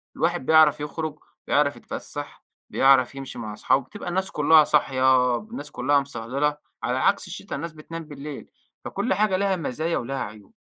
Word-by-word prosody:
الواحد 170 -4 0
بيعرف 155 -2 +6
يخرُج، 155 +1 -4 0.3
بيعرف 145 0 +2
يتفسَّح، 145 -1 -7 0.3
بيعرف 135 -1 +4
يمشي 135 -3 -7
مع 105 -2 -5
اصحابه، 130 +5 +1
بتبقى 205 0 -7
الناس 190 +2 -1
كُلّها 155 +1 +6
صاحية، 130 -4 +3
الناس 210 -10 -8
كُلّها 140 +3 +2
مصهلِلَة، 140 +3 -2 0.3
على - - 0
عكس - - +2
الشتا - - -6
الناس 170 -2 -5
بتنام 165 +2 -8
بالليل، 145 -1 -8 0.4
فكل - - -1
حاجة 195 -1 +2
لها 195 -1 +1
مزايا 160 +1 -2
ولها 135 +3 -3
عيوب. 105 0 -10
145 Hz, 160 wpm, -24 LUFS, 135-165 Hz, 0.4 s, بيعرف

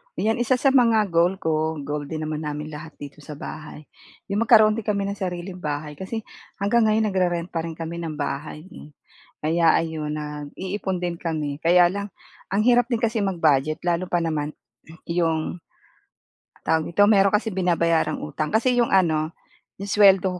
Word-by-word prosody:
'Yan 225 +2 0
isa 240 +1 +1
sa 275 +2 +3
mga 230 -6 +4
goal 170 +2 +3
ko 160 0 0
goal 145 +1 -4
din 155 +2 -5
naman 155 0 -4
namin 150 0 -4
lahat 155 0 -9
dito 145 +1 -9
sa 150 0 -10
bahay, 155 0 -8 0.5
yung 210 +3 0
magkaroon 215 -1 +6
din 225 - -5
kami 200 -1 0
ng 200 - -5
sariling 180 0 -5
bahay. 150 -3 -5
Kasi 220 +6 -5 0.4
hanggang 220 +3 +3
ngayon 215 0 +2
nagre-rent 180 -2 0
pa 165 -1 -3
rin 165 - -5
kami 165 +1 -6
ng 165 -2 -4
bahay 145 +1 -4
eh. 150 - -12 0.5
Kaya 165 +1 +3
ayun, 155 -2 -3
nag-iipon 155 +6 -4
din 175 -1 -2
kami. 155 -4 -3
Kaya 175 +2 +5
lang 200 +2 -5 0.4
ang 200 - +3
hirap 245 0 +4
din 230 - -1
kasi 230 -1 +1
mag-budget 155 -5 +1
lalo 175 +1 0
pa 175 -1 0
naman 155 -2 -2 0.6
yung 165 -1 0 1.1
tawag 160 -1 +1
nito, 205 +4 +4
meron 195 -1 +4
kasi 220 +1 -1
binabayarang 170 -3 +1
utang. 150 +1 -3
Kasi 245 +2 +2
yung 235 - +3
ano, 160 -3 +1 0.4
yung 200 - -6
suweldo 195 -3 +4
170 Hz, 170 wpm, -23 LUFS, 155-200 Hz, 1.1 s, magkaroon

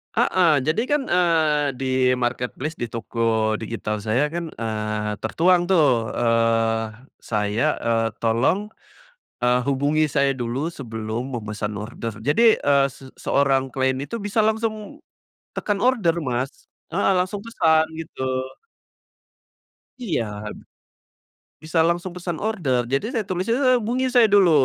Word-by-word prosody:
Heeh, 180 -3 +3 0.2
jadi 160 +8 +2
kan, 295 +2 +1
eee, 160 -5 +2
di 135 - -2 0.3
marketplace 125 +5 -3
di - - -2
toko 115 -1 -1
digital 110 -1 -4
saya 110 +8 0
kan, 170 +2 -4 0.2
eee, 105 -1 -2
tertuang 175 - +2
tuh, 145 -11 +3
eee, 115 -1 +2 0.3
saya, 105 +2 -1 0.2
eee, 115 -1 +1
tolong, 125 - +1 0.7
eee, 125 0 +3
hubungi 145 +3 +2
saya 140 -2 +1
dulu 125 +6 -2
sebelum 115 -3 -5
memesan 110 -2 -4
order. 115 +1 -6
Jadi, 220 - +4
eee, 140 -1 +4
se 135 - -13
seorang 135 -1 +1
klien 130 -1 +1
itu 175 - -5
bisa 205 +2 +1
langsung 220 +6 -2 0.5
tekan 205 -1 -1
order 205 -8 +2
Mas, 130 -3 -2 0.4
heeh, 195 +3 +2
langsung 190 +3 -5
pesan, 160 -8 +2
gitu. 160 -5 -5 1.8
Iya, 175 - -1 1.4
bisa 160 +2 -2
langsung 175 +1 -2
pesan 175 -2 -4
order. 155 - 0
Jadi 135 - +1
saya 225 -3 -1
tulisnya 185 +5 0
a 255 - +5
hubungi 240 +3 -1
saya 240 -2 +7
dulu, 195 -4 +6
140 Hz, 125 wpm, -23 LUFS, 115-180 Hz, 1.8 s, saya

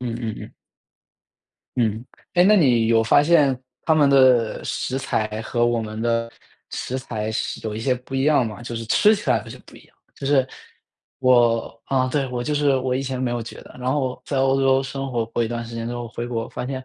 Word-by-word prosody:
嗯 120 -2 -3
嗯 110 -2 -3
嗯。 - - -10 1.2
嗯。 115 -1 0 0.3
哎， 175 - +5
那 210 +2 +6
你 120 - +4
有 115 -1 +4
发 145 +5 +4
现 145 -5 +3 0.3
他 160 - +3
们 145 -2 +4
的 130 -4 +4
食 130 - -3
材 110 -5 -2
和 120 +1 0
我 120 -1 +1
们 110 0 -6
的 115 0 0 0.4
食 130 +1 -4
材 110 -4 -4
是 - - -3
有 105 - -3
一 - - -4
些 130 +2 +1
不 125 +2 -10
一 135 +1 +1
样 145 -6 +3
吗？ 105 0 -8
就 120 0 -6
是 115 - -4
吃 210 - +4
起 - - -6
来 - - +3
好 - - -12
像 - - -10
不 - - -15
一 - - -14
样。 - - -28 0.2
就 135 - -6
是 135 -2 +3 0.7
我 120 -3 +3
啊， 130 -1 +1
对， 140 0 0
我 125 -1 -3
就 150 - -1
是 145 -2 +2
我 130 -1 -1
以 135 - -1
前 130 -1 -4
没 125 - 0
有 120 -1 -2
觉 115 - -10
得。 - - -15
然 125 +1 -1
后 130 -3 -2
在 140 - -2
欧 135 0 +2
洲 135 0 +3
生 135 0 -5
活 115 -2 0
过 115 +1 -2
一 - - -3
段 120 0 -4
时 115 0 -9
间 115 0 -4
之 120 - -4
后， 120 -1 -5
回 120 0 -5
国 115 0 -3
发 125 - -6
现， 130 -1 -5
125 Hz, 255 characters per minute, -22 LUFS, 115-135 Hz, 1.2 s, 那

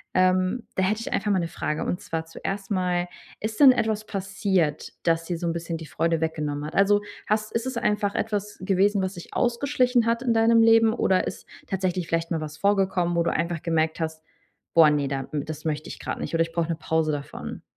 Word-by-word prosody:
Ähm, 185 +5 +2
da 190 - +1
hätte 210 +4 +1
ich - - -5
einfach 210 0 0
mal 190 - +3
'ne 170 - -1
Frage, 155 -1 -3
und 180 - -1
zwar 160 0 -4
zuerst 195 +4 -5
mal: 180 -2 0 0.3
Ist 215 0 -4
denn 275 -3 +9
etwas 220 -3 0
passiert, 195 -5 -1
das 165 0 +1
dir 175 -1 -3
so 175 - -3
'n 165 - 0
bisschen 170 0 -4
die 160 - -8
Freude 165 -1 0
weggenommen 150 -2 -2
hat? 155 - -7
Also, 205 +1 +4 0.3
hast 215 0 0
ist 230 +2 -2
es 255 -2 -3
einfach 210 -3 0
etwas 210 -1 -2
gewesen, 195 +1 +2
was 190 +1 -2
sich 175 - -10
ausgeschlichen 250 -1 +2
hat 230 +1 +1
in 240 - +2
deinem 225 0 +5
Leben? 225 0 +6
Oder 185 -4 +2
ist - - -7 0.2
tatsächlich 185 -2 -1
vielleicht 165 0 -1
mal 160 - 0
was 155 0 -6
vorgekommen, 190 -3 +1
wo 170 - +3
du 170 - +1
einfach 170 0 -1
gemerkt 160 -1 0
hast: 160 -1 -4 0.5
„Boah, 165 -2 +8
ne, 145 -2 +1
da 135 -1 -3
m 145 -1 -2
das 155 0 -7
möchte 155 +1 -2
ich - - -8
grad - - -4
nicht“, - - -5
oder 165 - +2
„Ich 165 - -7
brauche 170 -1 0
eine 165 - -1
Pause 160 0 0
davon.“? 145 -1 -6
185 Hz, 225 wpm, -25 LUFS, 165-210 Hz, 0.5 s, denn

